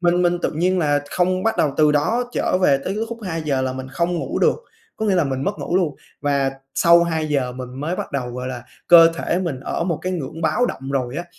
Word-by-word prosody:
mình 175 0 +2
mình 175 0 +2
tự - - 0
nhiên 180 +4 +1
là 145 -3 +1
không 185 +1 +1
bắt 225 - +1
đầu 145 -3 +2
từ 150 -1 +4
đó 235 +12 0
trở 185 - 0
về 140 -5 +5
tới 195 - -2
cái 220 +2 -1
khúc 235 0 -6
2:00 155 -7 -2
là 130 0 -1
mình 130 0 -6
không 175 +1 0
ngủ - - -3
được, - - +3 0.4
có 220 - -2
nghĩa 200 - +2
là 175 -3 +3
mình 135 -1 -2
mất 205 - -2
ngủ 175 - -1
luôn 165 -7 +1 0.3
và 140 -2 +1 0.2
sau 170 0 +5
2:00 150 -6 -1
mình 125 0 -7
mới 165 +5 -2
bắt - - -5
đầu, 130 -3 -2
gọi 125 +1 -5
là, 125 -2 -6 0.3
cơ 165 -1 +9
thể 170 - -1
mình 170 -8 -3
ở 170 - -3
một 170 -3 -1
cái 185 - -2
ngưỡng 160 -2 -5
báo 245 +8 +2
động 135 - -6
rồi 130 -1 -2
á, 170 - -3
165 Hz, 255 wpm, -21 LUFS, 135-180 Hz, 0.4 s, cơ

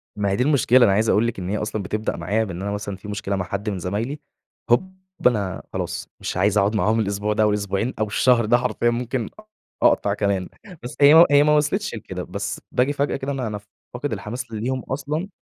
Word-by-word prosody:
ما 100 -1 0
هي 95 - +1
دي 125 - +1
المشكلة. 130 -3 +4
أنا 100 - +4
عايز 110 +3 +2
أقول 110 +4 +3
لكِ 115 -4 -4
إن 90 - -4
هي 105 - -1
أصلًا 105 -1 -3
بتبدأ 105 +3 -3
معايّا 105 +6 0
بإن 95 -4 -6
أنا 100 +1 -3
مثلًا 100 -1 -4
في 100 - -12
مشكلة 105 -1 -3
مع 90 -2 -2
حد 100 +3 -3
من 95 -3 -3
زمايلي، 110 - -3 0.5
هوب 185 +11 +2 0.3
أنا 100 -6 -1
خلاص - - -4
مش - - -4
عايز 100 +2 +2
أقعد 100 +2 +2
معاهم 110 +1 +2
الأسبوع 105 0 -1
ده، 110 +1 +2
أو 105 - +4
الأسبوعين 105 +3 -1
أو 110 - +1
الشهر 115 +2 +3
ده 120 +3 +4
حرفيًا 120 -1 0
ممكن 120 0 -2 0.5
أقطع 100 - +3
كمان 100 -3 -1 0.3
بس 120 - -7
هي 160 +4 +9
هي 145 0 +6
ما 150 0 +4
وصلتش 150 - 0
لكده، 95 -4 -6
بس 100 +1 -4
باجي 130 +3 +1
فجأة 145 0 -1
كده 135 +1 -3
أنا 130 -4 -2
أنا 105 -1 -4 0.3
فاقد 125 0 -3
الحماس 115 +4 -6
ليهم 125 +4 -2
أصلًا 150 +6 -3
110 Hz, 220 wpm, -22 LUFS, 100-125 Hz, 0.5 s, هي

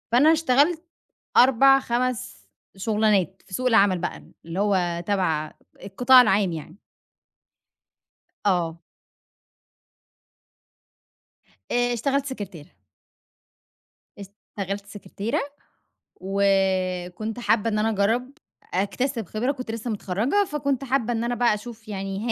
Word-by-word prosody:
فأنا 270 +7 +6
اشتغلت 315 +2 +2 0.5
4 270 +2 +6
5 240 - -3 0.3
شُغلانات 205 -2 +1
في 185 - -11
سوق 255 +4 -2
العمل 205 -6 +4
بقى 175 - -5 0.2
اللي 165 +4 -4
هو 180 -4 0
تبع 165 -7 0 0.3
القطاع 245 +6 +6
العام 195 -5 +2
يعني. 160 +3 -8 1.7
آه. 170 -4 0 2.9
آآ، 245 0 +1
اشتغلت 275 +4 0
سكرتيرة. 200 - -7 1.5
اشتغلت 200 0 -7
سكرتيرة، 205 +6 -4 0.8
وكنت 190 +1 0
حابة 210 0 +1
إن 210 - -1
أنا 220 +1 +1
أجرّب، 225 +5 0 0.4
أكتسب 225 +5 -1
خبرة 230 +9 -1
كنت 255 -4 -7
لسه 230 +1 -4
متخرّجة 220 - 0
فكنت 280 -3 -1
حابة 255 -2 0
إن 230 0 -1
أنا 240 +1 -1
بقى 240 -2 +2
اشوف 220 +1 -10
يعني 195 -1 -4
215 Hz, 100 wpm, -24 LUFS, 190-245 Hz, 2.9 s, فأنا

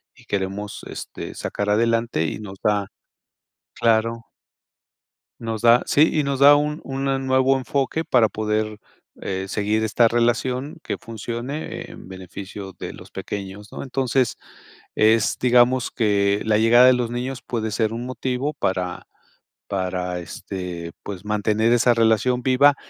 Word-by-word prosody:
y - - -19
queremos, 100 +1 -3
este, - - -7
sacar 105 0 -3
adelante 115 -3 +1
y 80 - -3
nos 100 -2 -9
da 105 -2 +1 0.9
Claro. 115 0 +2 1.2
Nos 115 -1 -4
da, 120 +1 +6
sí, 150 +2 +4
y 155 - +2
nos 140 -1 -1
da 145 +1 +9
un 150 +1 0
una 135 0 -1
nuevo 130 0 +2
enfoque 140 +4 -1
para 115 -4 +4
poder, 110 0 -2 0.4
eh, 95 0 -3
seguir 105 +2 0
esta 110 +2 +3
relación 125 +6 0
que - - -3
funcione 120 +6 -6
en - - -11
beneficio 95 +1 -8
de - - -6
los - - -13
pequeños, 100 0 -7
¿no? - - -6
Entonces, 130 -1 0 0.6
es 110 0 +3
digamos 125 0 +4
que 100 -2 +1
la 110 -1 +3
llegada 120 +3 +6
de 130 - +7
los 120 -1 -1
niños 125 +1 -4
puede 110 -2 -3
ser 110 +1 0
un 120 +2 -4
motivo 130 +3 -2
para 90 -7 -2 0.6
para, 90 -2 -2
este, 90 -1 -6
pues, 100 -1 -7
mantener 105 +2 +1
esa 120 0 +4
relación 115 +2 +2
viva, 140 +2 +5
115 Hz, 140 wpm, -22 LUFS, 105-125 Hz, 1.2 s, da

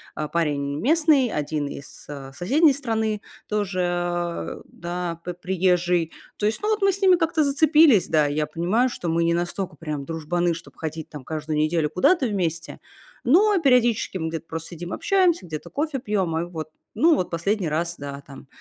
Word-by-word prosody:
а, 155 - -3
парень 145 -3 -1
местный, 300 - +3
1 150 -3 -2
из, 140 - -10
э, 140 -2 -7
соседней 275 - +3
страны 220 -5 -1 0.3
тоже, 175 - -2
да, 175 -1 -5
п 180 - -5
приезжий. 180 -2 +1 0.3
То 210 - +1
есть, 215 - -1
ну, 425 - +1
вот 430 -1 +1
мы 395 0 +4
с 385 - -6
ними 380 -2 +6
как-то 325 -2 +1
зацепились, 295 - +5
да, 155 -2 +3
и 145 - -2
я 150 0 0
понимаю, 180 +11 +1
что 180 -8 -4
мы 165 +1 +1
не 170 0 +2
настолько 175 +2 -3
прям 150 -3 -5
дружбаны, 165 +2 -1
чтоб 170 - -12
ходить 160 0 -5
там 150 -3 -9
каждую 155 +1 -4
неделю 155 0 +1
куда-то 275 - +3
вместе, 175 -7 -2 0.4
но 390 - +5
периодически 245 -8 +3
мы 160 -2 -2
где-то 165 0 -6
просто 165 0 -6
сидим, 175 +1 -7
общаемся, 370 - +2
где-то 155 -3 -7
кофе 295 -1 -2
пьем. 195 -8 -1
И 170 - -2
вот, 160 -3 -6 0.3
ну 325 +1 +5
вот, 180 - -1
последний 190 +3 -1
раз, 170 +3 -1
да, 140 0 -7
там. 135 -1 -12
175 Hz, 180 wpm, -24 LUFS, 160-245 Hz, 0.4 s, ними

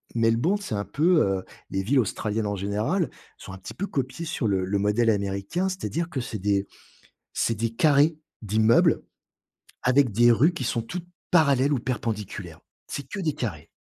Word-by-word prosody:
Melbourne, 115 - +2
c'est 185 - -5
un 100 0 -2
peu, 165 +2 +3
heu, 95 -1 0 0.3
les 95 0 -2
villes 130 +6 +3
australiennes 105 -1 -1
en 100 - -1
général, 105 - -1 0.3
sont - - -10
un 95 - -9
petit - - -9
peu 200 - -2
copiées 135 +2 -3
sur 150 -8 -2
le 95 -2 +1
le 100 +2 0
modèle 110 +3 +3
américain. 100 - -1
C'est-à-dire 170 -2 -3
que 140 - -3
c'est 115 -3 -4
des 100 0 +1 0.7
c'est 115 - 0
des 115 +2 -1
carrés 150 +5 +3 0.2
d'immeubles, 110 +2 +4 0.8
avec 130 -2 +3
des 120 +3 +5
rues 145 +9 +4
qui 155 - -5
sont 115 -1 -1
toutes 175 +8 -6 0.3
parallèles 140 -4 +4
ou 130 - +1
perpendiculaires. 105 -9 -4 0.3
C'est 140 -2 -6
que 205 - -6
des 160 -6 -1
carrés. 85 -9 -5
115 Hz, 180 wpm, -25 LUFS, 100-150 Hz, 0.8 s, des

